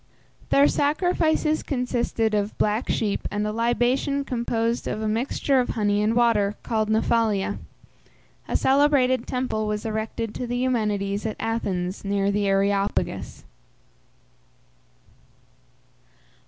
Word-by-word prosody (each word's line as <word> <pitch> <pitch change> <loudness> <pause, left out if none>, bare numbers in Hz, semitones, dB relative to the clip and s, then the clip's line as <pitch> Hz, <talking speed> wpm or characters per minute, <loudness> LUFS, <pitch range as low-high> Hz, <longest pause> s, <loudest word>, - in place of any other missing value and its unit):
Their 280 +1 +5
sacrifices 315 0 +1
consisted 245 -4 -1
of 205 0 -1
black 215 +3 0
sheep 210 -3 -1
and 210 0 -2
a 210 - -1
libation 245 +5 0
composed 235 -1 -1
of - - -3
a 220 - -2
mixture 255 +4 +1
of 250 - 0
honey 205 -2 +1
and 215 +2 +1
water, 220 -4 +2
called 220 -2 -1
Nephalia. 220 - +1 0.9
A - - +1
celebrated 265 -3 +3
temple 250 -4 -2
was 210 0 -3
erected 220 0 -3
to 250 - -4
the 245 +1 -2
Eumenides 210 -4 -1
at 215 - -5
Athens, 190 -5 -2
near 200 0 0
the 200 0 0
Areopagus. 195 +1 0
225 Hz, 115 wpm, -24 LUFS, 210-250 Hz, 0.9 s, Their